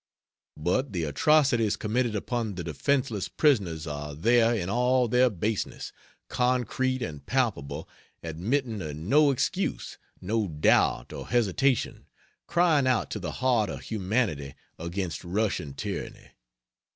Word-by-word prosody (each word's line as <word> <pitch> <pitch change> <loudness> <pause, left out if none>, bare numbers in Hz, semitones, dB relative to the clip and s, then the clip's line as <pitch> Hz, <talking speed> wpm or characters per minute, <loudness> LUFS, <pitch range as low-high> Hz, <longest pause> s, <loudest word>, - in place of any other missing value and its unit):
But 95 - 0
the 85 -3 -1
atrocities 130 - +3
committed 115 +1 -1
upon 110 -1 -2
the 90 - -4
defenceless 105 - -1
prisoners 95 - +1
are 75 -1 -5
there 115 +8 +4
in 90 -6 -2
all 125 +3 +2
their 125 +2 +4
baseness, 105 +1 -3 0.3
concrete 130 +1 0
and 75 -9 -6
palpable, 115 - -1 0.4
admitting 110 - -2
of 75 -3 -5
no 140 - +3
excuse, 135 - -2 0.2
no 110 +2 -1
doubt 75 -3 +2
or - - -7
hesitation, 120 +2 +1 0.4
crying 170 -6 +3
out 130 -3 +1
to 105 - -3
the 90 -5 -5
heart 120 -5 +1
of - - -6
humanity 95 - -2 0.2
against 85 +1 -4
Russian 90 -6 -2
tyranny. - - -6
110 Hz, 125 wpm, -27 LUFS, 85-125 Hz, 0.4 s, there